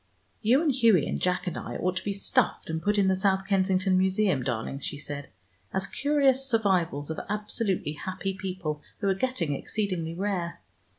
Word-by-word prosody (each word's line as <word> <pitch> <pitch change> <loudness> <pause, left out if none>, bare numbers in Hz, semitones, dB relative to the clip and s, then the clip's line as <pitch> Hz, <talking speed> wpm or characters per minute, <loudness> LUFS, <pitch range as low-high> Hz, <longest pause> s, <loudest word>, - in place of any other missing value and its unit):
"You 250 +8 +4
and 300 -4 +3
Hughie 230 - +4
and - - -3
Jack 180 0 +1
and 180 - -3
I - - -5
ought 185 +1 -1
to - - -3
be 205 - -1
stuffed 195 -4 +1
and 160 0 -2
put 210 +2 +1
in 200 -1 +4
the 190 - +3
South 190 0 +1
Kensington 190 -1 +2
Museum, 190 -5 +2
darling," 125 +2 -3
she 145 - -5
said, 145 -1 -6 0.5
"as 190 +1 +1
curious 275 +1 +2
survivals 185 - +1
of 160 - -4
absolutely 210 -5 -1
happy 185 +4 -4
people, 185 -6 -4 0.2
who 200 - -2
are - - +4
getting 190 - -1
exceedingly 175 -1 -2
rare. 185 -3 -2
190 Hz, 180 wpm, -28 LUFS, 170-210 Hz, 0.5 s, You